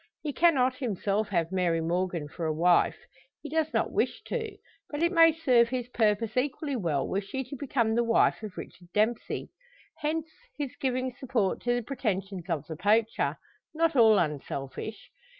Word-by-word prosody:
He 295 -2 -3
cannot 260 -7 +3
himself 210 -3 -1
have 170 -3 0
Mary 180 -3 +1
Morgan 170 -1 -1
for 160 +2 -4
a - - +1
wife 175 +3 +3 0.4
he 295 - -8
does 315 -1 0
not - - 0
wish - - -1
to 445 -3 -4 0.3
but 295 +2 -2
it 340 - +3
may 330 -2 +7
serve 255 -7 +3
his 250 -1 -3
purpose 220 -2 +1
equally 280 +2 -1
well 165 - -1
were 195 - -1
she 265 +7 -4
to 260 +2 -8
become 240 -4 0
the 235 +1 +2
wife 230 -1 +3
of 215 -3 -8
Richard 175 - -9
Dempsey. 220 +3 0 0.5
Hence 310 +1 -1 0.3
his 285 -3 -4
giving 255 -2 -1
support 245 -7 -1
to 240 0 +2
the 245 - -2
pretensions 195 -7 -3
of 155 -4 -1
the 160 - -6
poacher 215 +5 +1 0.4
not 330 -1 +2
all 220 -4 +6
unselfish. 150 +5 -4
230 Hz, 170 wpm, -28 LUFS, 185-270 Hz, 0.5 s, may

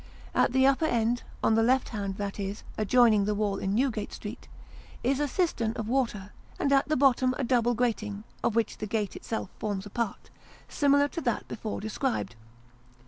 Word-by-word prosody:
At - - +3
the 265 +1 +4
upper 275 +4 +3
end, 235 -2 +1 0.2
on - - +4
the 225 - +4
left 255 +3 +2
hand 200 -3 -4
that 200 0 -4
is, 200 +1 -4
adjoining 215 -1 +4
the 210 0 0
wall 205 -1 0
in 195 +1 -1
Newgate 230 -4 0
Street - - -8 0.6
is 265 +3 +1
a 295 - +1
cistern 260 - 0
of 220 -2 -4
water, 225 -6 -1 0.2
and 280 - +1
at 275 +1 +3
the 310 - +2
bottom 255 -1 +3
a 280 - -1
double 240 -1 +2
grating 215 -4 -1 0.2
(of 225 - +1
which 230 -1 0
the 215 - -3
gate 210 -2 -2
itself 225 - -4
forms 205 -3 -3
a 205 - -10
part) 235 -2 -3 0.4
similar 285 0 +3
to 335 - -5
that 240 -6 -1
before 215 - -4
described. 220 - -2
230 Hz, 190 wpm, -28 LUFS, 210-260 Hz, 0.6 s, the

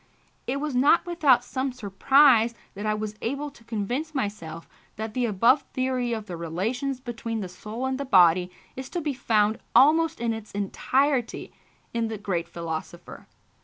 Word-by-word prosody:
It 270 +3 -1
was 300 -1 -3
not 285 +7 +4
without 295 -8 +3
some 260 +1 -3
surprise 240 +2 +4 0.2
that 205 +2 -5
I 215 - +1
was 215 0 -4
able 280 +4 -3
to 235 - -19
convince 240 +8 -3
myself 170 - -4 0.3
that 220 0 -5
the 245 0 0
above 230 +7 +4
theory 255 -2 -1
of 220 -2 -3
the 180 - -6
relations 220 - -3
between 230 -3 -5
the 190 - -4
soul 215 +7 -6
and 265 0 -2
the - - -1
body 180 -7 +5 0.3
is 265 0 -7
to - - +1
be 295 -2 -2
found 220 -4 +1 0.2
almost 320 +3 +5
in 230 -1 0
its 220 -1 -8
entirety 255 +6 0 0.4
in 230 -1 0
the 220 -1 -4
great 185 -4 -2
philosopher. 170 +1 -7
235 Hz, 165 wpm, -26 LUFS, 205-265 Hz, 0.4 s, body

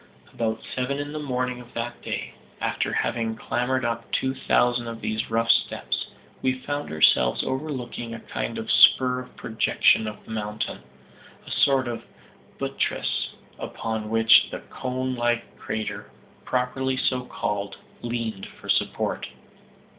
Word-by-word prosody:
About 110 -1 -1
seven 130 +2 -1
in 145 +1 -4
the 155 - -3
evening 125 -3 -2
of 120 0 -16
that 120 +1 -4
day, - - -4 0.3
after - - 0
having 115 -1 0
clambered 125 +3 0
up 115 0 -3
two 130 0 +1
thousand 120 -2 +2
of 115 -1 -5
these 110 +1 -2
rough 115 +1 +4
steps, - - +1 0.3
we 130 - +2
found 145 +2 -4
ourselves 70 -5 +5
overlooking 130 -4 -3
a 115 - -5
kind - - -4
of - - -2
spur 125 -1 +7
or 125 - -8
projection 110 0 +3
of 105 - -7
the - - -10
mountain 105 -1 -3 0.7
a - - -9
sort 135 -2 +4
of 120 -1 -4 0.5
buttress - - -1 0.2
upon 110 -1 -3
which 115 0 +6
the - - -6
conelike 125 -2 -1 0.2
crater, 110 0 -4 0.4
properly 130 +1 0
so 130 -1 +2
called, 100 -5 -3 0.2
leaned 115 -4 -3
for - - -11
support. - - +1
120 Hz, 140 wpm, -25 LUFS, 110-130 Hz, 0.7 s, spur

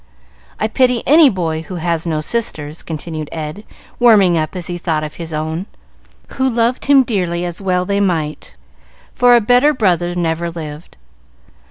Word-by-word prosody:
I 215 - +1
pity 250 +1 +1
any 300 0 +6
boy 165 -6 -2
who 180 +3 -8
has 170 -1 -2
no 155 -2 -1
sisters," 155 -6 -3
continued 155 -1 -6
Ed, 155 +5 -6 0.4
warming 210 -7 +5
up 155 +2 -2
as 180 -2 -5
he 175 0 -4
thought 160 -3 -1
of 150 0 -7
his 165 -1 -6
own, 160 +4 -3 0.6
who 265 0 0
loved 235 +1 0
him 280 -1 +6
dearly, 180 -7 -2
as 175 +2 -5
well 180 -2 0
they 200 +1 0
might, 160 -6 -2 0.6
for 245 -1 +5
a - - +6
better 250 +7 +3
brother 175 -6 +1
never 170 0 -1
lived. 155 -1 -9
175 Hz, 165 wpm, -17 LUFS, 160-220 Hz, 0.6 s, any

